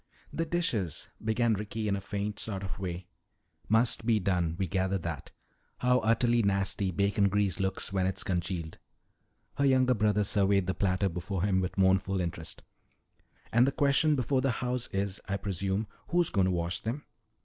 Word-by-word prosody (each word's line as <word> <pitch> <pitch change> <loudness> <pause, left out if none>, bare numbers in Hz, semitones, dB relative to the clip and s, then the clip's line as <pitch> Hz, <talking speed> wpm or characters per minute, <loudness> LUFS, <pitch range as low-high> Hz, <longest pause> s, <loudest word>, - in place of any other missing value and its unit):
"The 165 0 -1
dishes 115 - -1
" - - -21
began 110 +1 +2
Ricky 105 +1 -3
in 100 - +1
a 100 - -4
faint 100 +1 -4
sort 100 -3 -3
of 95 0 -5
way. 90 -1 -4 0.6
"Must 110 +1 +2
be 110 -1 +3
done. 90 -4 0
We 95 - 0
gather 95 +1 0
that. 85 -5 -5 0.5
How 125 0 +3
utterly 115 +1 +3
nasty 100 -1 0
bacon 100 +2 +2
grease 100 -3 0
looks 95 0 -1
when 95 -1 +1
it's 95 - -1
congealed." 85 -3 -3 0.8
Her 140 - +2
younger 130 -1 +4
brother 105 -2 +2
surveyed 100 -1 +2
the 95 - -1
platter 95 0 +1
before 90 +1 -3
him 95 -2 +2
with 90 +1 -4
mournful 95 0 +3
interest. 85 -2 -4 0.9
"And 120 +3 +5
the - - +2
question 145 +2 +3
before 130 0 +1
the 135 -2 +1
house 125 -1 -1
is, 100 0 -2
I 100 -1 -1
presume, 100 +1 -2 0.2
who's 175 -1 +1
going 95 -3 +3
to 95 - +1
wash 85 0 -1
them?" 120 +6 -4
100 Hz, 175 wpm, -30 LUFS, 95-115 Hz, 0.9 s, And